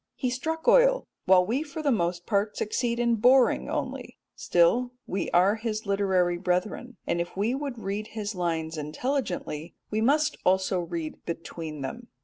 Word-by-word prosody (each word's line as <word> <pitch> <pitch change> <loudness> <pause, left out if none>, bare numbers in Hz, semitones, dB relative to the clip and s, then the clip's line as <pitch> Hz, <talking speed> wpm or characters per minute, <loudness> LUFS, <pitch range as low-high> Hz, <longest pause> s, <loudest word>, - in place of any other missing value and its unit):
He 255 - -1
struck 320 - -3
oil, - - +5 0.2
while 185 -1 +6
we 240 +8 0
for 310 0 -6
the 285 - +3
most 175 -5 0
part 210 0 0
succeed 235 +2 -1
in 235 -1 +2
boring 250 +3 +4
only; - - -4 0.2
still 235 +9 +2
we 195 - -2
are 190 +5 +4
his 220 -1 -3
literary 190 -3 +1
brethren, 190 +7 -2
and 170 - 0
if 175 - -6
we 215 +5 +1
would 275 -2 -4
read 210 0 -4
his 210 0 -2
lines 165 -3 -2
intelligently 170 - -3 0.2
we 215 +1 0
must 295 +6 +2
also 185 0 +2
read 170 -2 -5
between 165 -2 -6
them. 235 - -6
205 Hz, 160 wpm, -27 LUFS, 175-245 Hz, 0.2 s, while